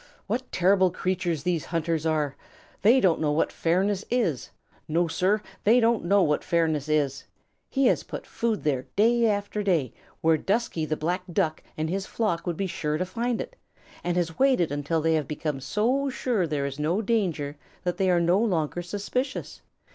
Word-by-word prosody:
What 245 Hz, +5 st, -3 dB
terrible 190 Hz, +1 st, +4 dB
creatures 180 Hz, -4 st, -2 dB
these 175 Hz, -3 st, 0 dB
hunters 165 Hz, -1 st, -1 dB
are! 150 Hz, -3 st, 0 dB, 0.5 s
They 230 Hz, +6 st, +6 dB
don't 180 Hz, -9 st, +3 dB
know 150 Hz, -2 st, +2 dB
what 150 Hz, -, +1 dB
fairness 190 Hz, +4 st, +1 dB
is. 215 Hz, -, 0 dB, 0.4 s
No, 170 Hz, +2 st, +1 dB
Sir, 195 Hz, +6 st, +1 dB, 0.2 s
they 230 Hz, +4 st, +5 dB
don't 230 Hz, -4 st, +2 dB
know 200 Hz, +2 st, +4 dB
what 150 Hz, -2 st, +1 dB
fairness 160 Hz, -3 st, 0 dB
is. 140 Hz, -3 st, 0 dB, 0.4 s
He 270 Hz, -1 st, +1 dB
has -, -, +3 dB
put -, -, -7 dB
food 230 Hz, -2 st, -2 dB
there 135 Hz, -4 st, 0 dB
day 230 Hz, +3 st, +4 dB
after 205 Hz, 0 st, -1 dB
day, 170 Hz, -, +1 dB, 0.3 s
where 160 Hz, 0 st, +4 dB
Dusky 195 Hz, -3 st, -1 dB
the 155 Hz, -, -1 dB
Black 175 Hz, +4 st, -1 dB
Duck 165 Hz, -4 st, 0 dB, 0.2 s
and 155 Hz, 0 st, -1 dB
his 195 Hz, +3 st, -2 dB
flock 195 Hz, -7 st, -1 dB
would 170 Hz, -2 st, -1 dB
be 195 Hz, -, -1 dB
sure 155 Hz, -4 st, -2 dB
to 185 Hz, -, -1 dB
find 235 Hz, +4 st, -2 dB
it, -, -, -6 dB, 0.5 s
and 175 Hz, 0 st, -1 dB
has 165 Hz, -2 st, -1 dB
waited 260 Hz, -, +3 dB
until 145 Hz, +3 st, -1 dB
they 160 Hz, +1 st, +2 dB
have 155 Hz, -3 st, 0 dB
become 150 Hz, -2 st, -3 dB
so 230 Hz, -, 0 dB
sure 245 Hz, -8 st, 0 dB
there 145 Hz, -3 st, -1 dB
is 140 Hz, +1 st, -5 dB
no 170 Hz, +8 st, 0 dB
danger 175 Hz, -10 st, 0 dB, 0.3 s
that 180 Hz, -1 st, -1 dB
they 190 Hz, -1 st, +2 dB
are 175 Hz, -1 st, +4 dB
no 170 Hz, +3 st, +3 dB
longer 175 Hz, -6 st, 0 dB
suspicious. 205 Hz, +9 st, -4 dB
175 Hz, 185 wpm, -26 LUFS, 155-210 Hz, 0.5 s, They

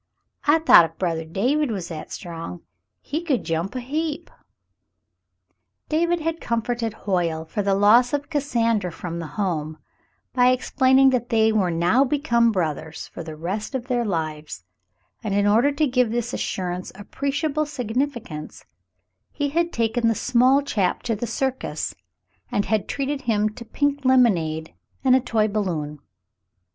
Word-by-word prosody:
I 295 Hz, +2 st, +5 dB
thought 315 Hz, -, +7 dB
if 165 Hz, 0 st, -11 dB
brothah 165 Hz, -3 st, -2 dB
David 265 Hz, -, +1 dB
was 190 Hz, -6 st, -4 dB
that 160 Hz, -3 st, -7 dB
strong, 165 Hz, -, -7 dB, 0.4 s
he 310 Hz, +4 st, -3 dB
could 295 Hz, -8 st, 0 dB
jump 165 Hz, +7 st, -2 dB
a -, -, -1 dB
heap." 305 Hz, +5 st, -3 dB, 1.6 s
David 340 Hz, +2 st, +1 dB
had 330 Hz, +1 st, -2 dB
comforted 235 Hz, 0 st, -1 dB
Hoyle 170 Hz, -5 st, 0 dB
for 205 Hz, +6 st, -3 dB
the 195 Hz, -1 st, +1 dB
loss 220 Hz, +5 st, +5 dB
of 290 Hz, 0 st, -2 dB
Cassandra 230 Hz, -, 0 dB
from 170 Hz, 0 st, -6 dB
the 165 Hz, -, -5 dB
home 160 Hz, -6 st, -2 dB, 0.6 s
by 250 Hz, -1 st, +4 dB
explaining 260 Hz, +1 st, +4 dB
that 245 Hz, -2 st, -1 dB
they 220 Hz, -1 st, +3 dB
were 205 Hz, -5 st, +2 dB
now 175 Hz, +10 st, +3 dB
become 245 Hz, -5 st, +2 dB
brothers 160 Hz, -4 st, -3 dB
for -, -, -8 dB
the 160 Hz, -1 st, -8 dB
rest 190 Hz, -, -4 dB
of 250 Hz, -2 st, -3 dB
their 245 Hz, -2 st, 0 dB
lives, 155 Hz, -, -4 dB, 0.6 s
and 205 Hz, -3 st, -1 dB
in 205 Hz, 0 st, +2 dB
order 230 Hz, +7 st, +4 dB
to 305 Hz, +2 st, +2 dB
give 250 Hz, -3 st, +2 dB
this 240 Hz, +2 st, -2 dB
assurance 180 Hz, -1 st, -3 dB
appreciable 290 Hz, -, -2 dB
significance, 245 Hz, -, -4 dB, 0.7 s
he 285 Hz, -1 st, -2 dB
had 335 Hz, +3 st, 0 dB
taken 230 Hz, -1 st, 0 dB
the 225 Hz, -, +2 dB
small 255 Hz, +4 st, +3 dB
chap 205 Hz, -9 st, 0 dB
to 230 Hz, -, -1 dB
the 235 Hz, +3 st, -4 dB
circus 250 Hz, -, -2 dB, 0.6 s
and 205 Hz, -, 0 dB
had 215 Hz, -3 st, 0 dB
treated 280 Hz, 0 st, -2 dB
him 215 Hz, -4 st, +1 dB
to 235 Hz, +3 st, -10 dB
pink 285 Hz, +4 st, -1 dB
lemonade 175 Hz, -12 st, +2 dB, 0.3 s
and 260 Hz, -1 st, +5 dB
a -, -, +5 dB
toy 225 Hz, -4 st, +1 dB
balloon. 170 Hz, -8 st, -2 dB
230 Hz, 155 wpm, -23 LUFS, 180-265 Hz, 1.6 s, thought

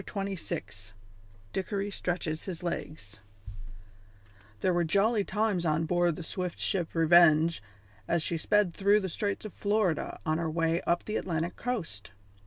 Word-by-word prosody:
CHAPTER 200 Hz, -1 st, -4 dB
XXVI 105 Hz, -, -5 dB, 0.6 s
DICKORY 200 Hz, +1 st, -2 dB
STRETCHES 175 Hz, -4 st, -2 dB
HIS 180 Hz, -3 st, -6 dB
LEGS 110 Hz, -, -5 dB, 1.4 s
There 185 Hz, -, +2 dB
were 175 Hz, 0 st, +2 dB
jolly 205 Hz, +6 st, +2 dB
times 205 Hz, -3 st, 0 dB
on 160 Hz, 0 st, +1 dB
board 175 Hz, 0 st, +2 dB
the 175 Hz, -, -7 dB
swift 180 Hz, +1 st, -3 dB
ship 175 Hz, -4 st, -1 dB
Revenge 165 Hz, -1 st, +5 dB, 0.5 s
as 170 Hz, -2 st, +1 dB
she 170 Hz, -, -1 dB
sped 205 Hz, +1 st, +2 dB
through 200 Hz, +3 st, +3 dB
the 190 Hz, -, -3 dB
straits 200 Hz, +5 st, -3 dB
of 215 Hz, -, -7 dB
Florida 205 Hz, -6 st, 0 dB
on 155 Hz, 0 st, +1 dB
her 165 Hz, -1 st, -1 dB
way 165 Hz, +1 st, +1 dB
up 170 Hz, 0 st, +1 dB
the 215 Hz, -, -2 dB
Atlantic 170 Hz, -1 st, -2 dB
coast. 180 Hz, -, -4 dB
175 Hz, 150 wpm, -29 LUFS, 160-200 Hz, 1.4 s, Revenge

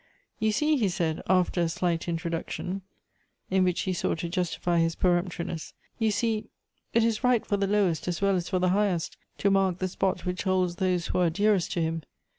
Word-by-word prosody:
" -, -, -43 dB
You 220 Hz, 0 st, +2 dB
see," 300 Hz, +7 st, +2 dB
he 215 Hz, -6 st, +2 dB
said, 165 Hz, -3 st, -1 dB
after 185 Hz, -1 st, +3 dB
a 170 Hz, -, +1 dB
slight 170 Hz, 0 st, -1 dB
introduction, 170 Hz, +3 st, -3 dB, 0.7 s
in 190 Hz, 0 st, +4 dB
whicli 180 Hz, -1 st, +1 dB
he 185 Hz, -, -1 dB
sought 175 Hz, -, -1 dB
to 170 Hz, +1 st, -4 dB
justify 175 Hz, -1 st, 0 dB
his 165 Hz, 0 st, +1 dB
peremptoriness; 175 Hz, -2 st, -1 dB
" -, -, -39 dB
you 225 Hz, -1 st, +2 dB
see, 215 Hz, +1 st, 0 dB, 0.4 s
it 230 Hz, -, +3 dB
is 230 Hz, +1 st, 0 dB
right 250 Hz, -3 st, +3 dB
for 205 Hz, -, 0 dB
the 200 Hz, 0 st, 0 dB
lowest 190 Hz, -6 st, +1 dB
as 175 Hz, -1 st, -1 dB
well 200 Hz, -1 st, +2 dB
as 175 Hz, -2 st, -2 dB
for 185 Hz, -, +1 dB
the 180 Hz, 0 st, +2 dB
highest 190 Hz, -3 st, +1 dB, 0.2 s
to 200 Hz, -, +2 dB
mark 190 Hz, -2 st, +2 dB
the 185 Hz, -, -1 dB
spot 190 Hz, +1 st, -1 dB
which 180 Hz, 0 st, -2 dB
holds 185 Hz, -2 st, +1 dB
those 185 Hz, -3 st, +1 dB
who -, -, -1 dB
are 175 Hz, -2 st, +4 dB
dearest 200 Hz, +1 st, +2 dB
to 170 Hz, -, 0 dB
him. 165 Hz, 0 st, -1 dB
185 Hz, 215 wpm, -27 LUFS, 170-200 Hz, 0.7 s, in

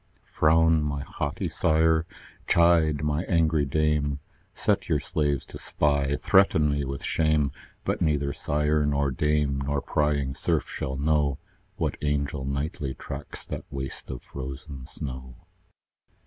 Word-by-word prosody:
Frown, 80 Hz, 0 st, +4 dB
my 70 Hz, -1 st, -2 dB
haughty -, -, -3 dB
sire! 80 Hz, 0 st, +2 dB, 0.4 s
chide, 80 Hz, -3 st, +4 dB
my 75 Hz, +1 st, +1 dB
angry 80 Hz, -3 st, +2 dB
dame! 75 Hz, -1 st, +1 dB, 0.3 s
Set -, -, 0 dB
your 75 Hz, -, +3 dB
slaves 75 Hz, -3 st, -1 dB
to -, -, -10 dB
spy; 70 Hz, -1 st, +1 dB
threaten 80 Hz, -5 st, +4 dB
me 70 Hz, 0 st, 0 dB
with 70 Hz, 0 st, -5 dB
shame: 75 Hz, -3 st, +2 dB, 0.3 s
But -, -, -1 dB
neither 75 Hz, -3 st, +1 dB
sire 75 Hz, +2 st, +1 dB
nor 70 Hz, -1 st, +1 dB
dame, 75 Hz, 0 st, +1 dB
nor 70 Hz, +1 st, 0 dB
prying 70 Hz, -2 st, 0 dB
serf -, -, 0 dB
shall 65 Hz, 0 st, -4 dB
know, 75 Hz, -1 st, +1 dB, 0.4 s
What -, -, -2 dB
angel 70 Hz, -1 st, -1 dB
nightly 70 Hz, 0 st, -3 dB
tracks 70 Hz, +1 st, -7 dB
that -, -, -6 dB
waste 65 Hz, -1 st, -6 dB
of 60 Hz, -2 st, -6 dB
frozen 70 Hz, 0 st, -7 dB
snow. 65 Hz, -5 st, -7 dB
75 Hz, 135 wpm, -26 LUFS, 70-75 Hz, 0.4 s, Frown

